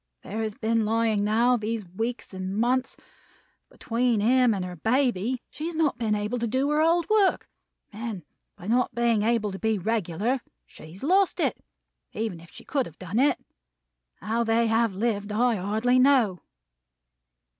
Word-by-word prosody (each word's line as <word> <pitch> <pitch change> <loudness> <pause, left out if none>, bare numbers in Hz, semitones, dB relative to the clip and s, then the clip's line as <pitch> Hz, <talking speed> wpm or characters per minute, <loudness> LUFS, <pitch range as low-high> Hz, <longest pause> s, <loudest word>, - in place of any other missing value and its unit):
There 210 - -6
he 225 - -1
has 215 -1 -5
been 225 0 0
lying, 220 -1 +1
now, 235 +4 +3
these 220 -1 -3
weeks 225 +6 -4
and 190 +1 -4
months. 255 +3 0 0.7
Between 235 -1 0
him 250 +3 +4
and 190 -4 -2
her 180 0 -7
baby, 240 - 0
she 310 - -5
has 340 - -5
not 305 -6 +1
been 220 -3 +1
able 210 +4 -2
to 235 - -1
do 260 +5 0
her 300 +1 +2
old 335 +1 +2
work; 420 -3 +2 0.5
and 215 -4 -5 0.3
by 175 - -13
not 245 +4 +1
being 235 -2 +2
able 220 -1 +1
to 190 - -7
be 220 -1 0
regular, 220 +4 -1 0.2
she 155 - -13
has 190 - -11
lost 375 +3 +2
it, 280 -7 -1 0.5
even 215 -6 -3
if 165 0 -15
she - - -14
could 275 -3 -1
have 165 - -15
done 185 +5 -3
it. 280 0 +3 0.8
How 230 +2 -1
they 230 +1 +2
have 225 -2 +1
lived, 205 -1 -1
I 240 +3 +2
hardly 220 +7 +1
know!" 255 -9 +4
230 Hz, 175 wpm, -26 LUFS, 210-250 Hz, 0.8 s, him